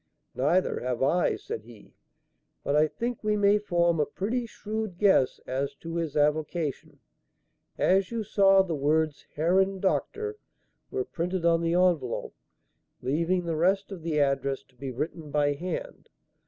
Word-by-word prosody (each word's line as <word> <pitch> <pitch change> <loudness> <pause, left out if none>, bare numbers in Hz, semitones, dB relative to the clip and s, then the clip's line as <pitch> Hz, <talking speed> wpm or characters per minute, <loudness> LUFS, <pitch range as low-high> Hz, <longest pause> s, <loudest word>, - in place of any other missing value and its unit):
"Neither 170 +8 +1
have 125 0 -2
I," 175 +6 +2
said 110 - -6
he; 115 -2 -16 0.7
"but 140 - 0
I 155 +1 +5
think 235 +7 -4
we 210 0 +1
may 205 0 +4
form 170 -4 +1
a 150 - +3
pretty 230 +9 -2
shrewd 215 -4 -5
guess 190 -10 +3
as 140 +2 -2
to 165 +3 -6
his 160 -3 -2
avocation. 150 0 -1 0.8
As 190 +1 +3
you 230 -1 -2
saw, 195 -2 +5
the 175 -3 -3
words 150 +1 0
'Herrn 190 +5 +2
Dr.' 430 - -1 0.5
were 405 -1 -2
printed 180 - -3
on 165 -1 +4
the 165 0 0
envelope, 175 -9 +1 0.7
leaving 170 +6 0
the 165 -1 -1
rest 190 +5 +1
of 190 -4 -7
the 160 -2 -1
address 140 -1 0
to 130 - -28
be 135 +2 -6
written 150 +4 -5
by 145 0 +2
hand. 185 - -6
170 Hz, 155 wpm, -27 LUFS, 145-195 Hz, 0.8 s, I